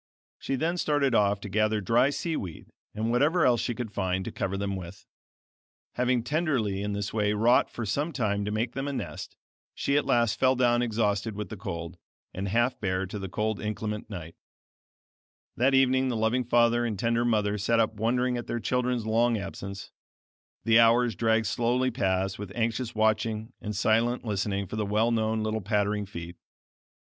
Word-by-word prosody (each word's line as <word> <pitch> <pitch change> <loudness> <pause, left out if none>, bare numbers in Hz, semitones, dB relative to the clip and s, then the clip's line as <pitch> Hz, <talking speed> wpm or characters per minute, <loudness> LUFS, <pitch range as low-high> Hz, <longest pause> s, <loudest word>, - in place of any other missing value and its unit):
She 135 - -2
then 165 +6 -1
started 145 -5 +1
off 100 -2 +3
to - - -6
gather 110 +2 +1
dry 115 +7 +3
sea 160 +3 -2
weed, 90 - -7 0.2
and 110 +2 -1
whatever 150 +8 +3
else 120 -2 +3
she 120 - -2
could 110 -2 -5
find, 95 -1 -1
to - - -4
cover 95 0 -3
them 100 0 -2
with. 95 +2 -9 0.9
Having 125 -1 +1
tenderly 125 - 0
in 105 0 -2
this 100 0 -3
way 105 -1 +1
wrought 115 +4 +3
for 120 - -5
some 145 +11 -1
time 105 -7 -1
to - - -2
make 115 +3 -1
them 135 +2 -4
a 140 - -2
nest, - - -6 0.4
she 140 - 0
at 145 - 0
last 120 -3 +2
fell 130 0 +4
down 120 -1 +3
exhausted 110 -2 0
with 105 0 -5
the - - -6
cold, 90 -4 -6 0.3
and 95 +2 -3
half 120 +5 +1
bare 95 -1 -1
to 100 +2 -6
the 95 -1 -5
cold 110 +2 -1
inclement 105 0 -4
night. 85 -5 -7 1.2
That 135 +2 +3
evening 130 0 +3
the 120 -3 -1
loving 115 +3 +1
father 120 0 +3
and 110 -4 -2
tender 115 +3 +1
mother 105 -3 +1
sat 115 +3 +2
up 110 -1 +2
wondering 125 +3 0
at 120 - -6
their 120 - -2
children's 125 0 -1
long 115 +1 +2
absence; 100 -1 -7 0.7
the 115 0 +5
hours 115 +1 +4
dragged 115 0 +1
slowly 125 +4 +1
past 95 -4 -1
with 100 -2 -6
anxious 115 +1 -1
watching 110 +1 0
and 105 0 -4
silent 115 +4 +1
listening 100 -1 -1
for 110 - -6
the 110 - 0
well 110 +3 +2
known 110 -1 0
little 110 0 -1
pattering 105 0 0
feet. 85 -2 -8
110 Hz, 185 wpm, -27 LUFS, 100-120 Hz, 1.2 s, the